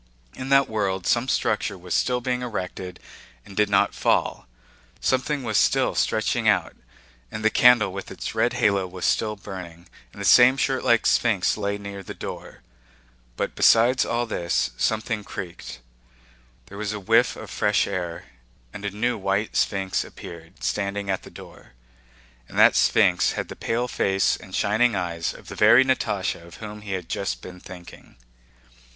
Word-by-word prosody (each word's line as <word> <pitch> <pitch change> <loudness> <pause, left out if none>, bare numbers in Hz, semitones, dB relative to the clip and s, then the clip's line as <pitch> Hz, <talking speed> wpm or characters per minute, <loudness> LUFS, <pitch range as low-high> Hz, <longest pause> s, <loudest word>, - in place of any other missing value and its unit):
In 130 +1 -7
that 135 0 +5
world 100 -5 -2
some 120 +2 +1
structure 105 -6 0
was 90 0 -6
still 125 -1 +1
being 125 0 -2
erected 95 -6 -5 0.5
and 100 - -13
did 105 0 +2
not 100 -1 +2
fall, - - 0 0.5
something 130 +2 0
was 110 -3 +1
still - - +2
stretching - - 0
out, - - +2 0.6
and 110 0 -5
the 110 - +4
candle 120 -6 +5
with 95 - -7
its - - -6
red 115 +2 +1
halo 100 -6 +1
was 90 0 -6
still 105 -1 +1
burning, 90 -4 -10 0.2
and - - -14
the 100 - -4
same 125 +5 +7
shirtlike 130 -4 +1
sphinx 110 -6 +2
lay 100 -1 -2
near 100 -1 -8
the 95 - -9
door; - - -8 0.7
but - - -2
besides 120 +3 +4
all 120 +1 -1
this 85 - -1
something 110 - -1
creaked, 90 -4 -8 0.9
there 100 +8 -11
was 105 0 -3
a 105 - -5
whiff 115 +5 +3
of - - -10
fresh 105 0 +1
air, 90 -4 -4 0.5
and 105 - -7
a - - 0
new 115 +3 -2
white 100 +2 -1
sphinx 95 -2 0
appeared, 85 +1 -12
standing 100 -1 -2
at 95 - -2
the - - -12
door. - - -14 0.8
And - - -9
that - - +6
sphinx - - +3
had - - -4
the - - -7
pale 120 +2 -2
face 95 -5 +1
and 95 -2 -10
shining 110 +2 +2
eyes 85 -3 -2
of - - -14
the - - -8
very 130 +2 +6
Natásha 100 -9 -1
of 85 - -13
whom 105 -1 -9
he 105 -2 -5
had 90 -3 -4
just 100 - -3
been 90 0 -10
thinking. 90 -1 -13
100 Hz, 170 wpm, -24 LUFS, 95-115 Hz, 0.9 s, same